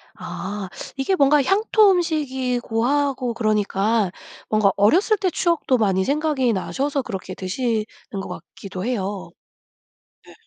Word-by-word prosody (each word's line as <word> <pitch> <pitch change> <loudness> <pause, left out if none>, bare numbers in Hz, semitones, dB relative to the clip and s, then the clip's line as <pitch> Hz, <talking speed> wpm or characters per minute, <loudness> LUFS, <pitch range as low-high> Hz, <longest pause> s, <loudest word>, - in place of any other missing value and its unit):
아. 200 -1 -6 0.3
이게 275 +8 0
뭔가 290 -2 +4
향토음식이고 300 - +2
하고 275 -3 0
그러니까 215 -2 +1 0.4
뭔가 215 -2 +3
어렸을 355 - +4
때 380 -2 0
추억도 335 -7 +1
많이 190 -4 +1
생각이 285 -4 +1
나셔서 275 +8 -1
그렇게 190 -6 -6
드시는 215 +4 -1 0.4
것 - - -7 0.3
같기도 190 -1 -7
해요. 205 -5 -3 1.0
예. - - -14
245 Hz, 270 characters per minute, -22 LUFS, 205-290 Hz, 1.0 s, 뭔가